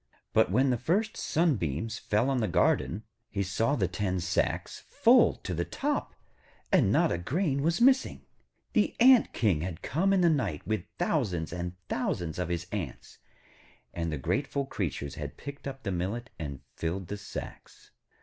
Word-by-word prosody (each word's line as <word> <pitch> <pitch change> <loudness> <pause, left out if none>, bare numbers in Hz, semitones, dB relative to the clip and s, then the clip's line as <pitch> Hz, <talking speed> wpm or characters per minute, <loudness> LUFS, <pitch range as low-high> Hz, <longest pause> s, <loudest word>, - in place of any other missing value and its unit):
But - - +4
when 130 +7 +3
the 120 - 0
first 205 - 0
sunbeams 110 - 0
fell 110 +6 +1
on 130 - +1
the 110 - +1
garden, 90 +3 +1 0.3
he 100 -1 -1
saw 110 +9 +1
the 95 -8 +1
ten 95 +1 -1
sacks 90 +1 -1
full - - +5
to - - -3
the - - 0
top, - - -2 0.6
and - - +4
not - - +3
a 85 - -1
grain 140 - 0
was 165 +3 +1
missing. 260 +2 +3 0.5
The 215 -4 +2
Ant 255 0 +7
King 95 -10 +1
had 90 0 -5
come 180 +9 +1
in 195 -2 +4
the 175 - +5
night 115 - 0
with 110 -3 -1
thousands 105 - 0
and 90 0 -4
thousands 85 -2 -2
of 90 -1 -2
his 85 0 -2
Ants, 100 -5 -6 0.7
and 85 -1 -2
the 75 - -2
grateful 140 - -1
creatures 80 - -3
had - - -6
picked 140 0 -8
up 135 -1 -7
the 100 - -2
millet 100 +8 -3
and 70 -4 -5
filled 90 +3 -3
the 105 - -4
sacks. 100 - -9
105 Hz, 170 wpm, -29 LUFS, 85-140 Hz, 0.7 s, Ant